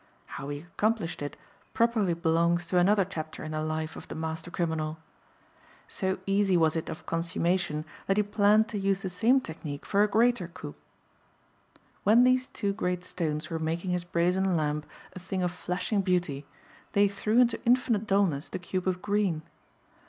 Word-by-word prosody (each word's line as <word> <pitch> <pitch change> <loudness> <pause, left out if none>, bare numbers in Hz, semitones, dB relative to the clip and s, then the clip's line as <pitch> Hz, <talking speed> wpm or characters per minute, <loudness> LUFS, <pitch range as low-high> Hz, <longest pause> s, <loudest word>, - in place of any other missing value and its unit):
How 140 - -7
he 145 0 -4
accomplished 175 +1 -1
it 145 - -5 0.4
properly 225 -7 +2
belongs 170 +1 +2
to 180 +1 +2
another 195 +2 +4
chapter 155 -4 -6
in 155 - -5
the 155 0 -2
life 155 0 -3
of - - -9
the - - -7
master 160 +1 -4
criminal. 160 -3 -2 0.9
So 190 0 -1
easy 195 -2 +3
was 160 -1 +3
it 160 - -3
of - - -7
consummation 165 -1 -1 0.2
that 195 - +2
he 210 - +4
planned 210 +1 +4
to 210 - -3
use 195 0 0
the 190 - -3
same 235 +9 +3
technique 150 - -7
for 200 - +2
a 210 - +5
greater 225 -2 +2
coup. 170 -4 -9 1.3
When 225 +5 +6
these 255 0 +3
two 200 -2 -2
great 180 -3 -2
stones 155 -3 -3
were 165 - -2
making 165 +3 -2
his 180 -1 0
brazen 180 +1 +1
lamp 150 -1 -1 0.3
a - - -8
thing 185 0 -3
of 180 - 0
flashing 180 +3 -1
beauty 175 -7 -1 0.5
they 200 0 +5
threw 210 +3 -1
into 240 -2 +3
infinite 235 -3 +2
dullness 190 -8 +1
the - - -4
cube 185 +1 -3
of 180 -1 -1
green. 200 -6 0
180 Hz, 175 wpm, -28 LUFS, 160-200 Hz, 1.3 s, When